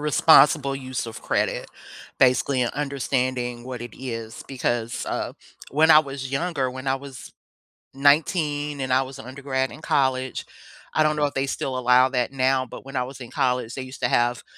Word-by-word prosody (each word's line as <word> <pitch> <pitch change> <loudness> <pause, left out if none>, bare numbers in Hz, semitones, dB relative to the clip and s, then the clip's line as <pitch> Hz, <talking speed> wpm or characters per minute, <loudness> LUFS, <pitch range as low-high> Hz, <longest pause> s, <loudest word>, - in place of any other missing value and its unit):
responsible 150 -1 +5
use 130 -2 -4
of 115 - -8
credit, - - -1 0.5
basically 130 0 +3
understanding 130 -3 -2
what 125 -2 -6
it 120 -2 -8
is 115 -3 -6
because, 120 -3 -2
uh, - - -3 0.4
when 155 +3 +4
I 155 - +10
was 135 -3 -3
younger, 135 -3 -1
when 130 +1 -8
I 130 - +2
was 135 -2 -9 0.6
19 145 0 +2
and 130 -1 0
I 130 - +4
was 135 0 -7
an 135 - -10
undergrad 130 0 -2
in 135 +6 -11
college, 130 -3 0 0.5
I - - +2
don't 155 0 +3
know 150 -1 +1
if 145 - -2
they 135 0 -1
still 135 -1 -3
allow 125 +1 +5
that 125 -2 -1
now, 130 -1 +1
but 120 - -10
when 135 0 -9
I 125 - +1
was 130 +2 -9
in 120 -2 -9
college, 125 -4 0
they 130 - -5
used 130 +1 -9
to - - +2
have 120 0 +1
130 Hz, 185 wpm, -24 LUFS, 125-140 Hz, 0.6 s, I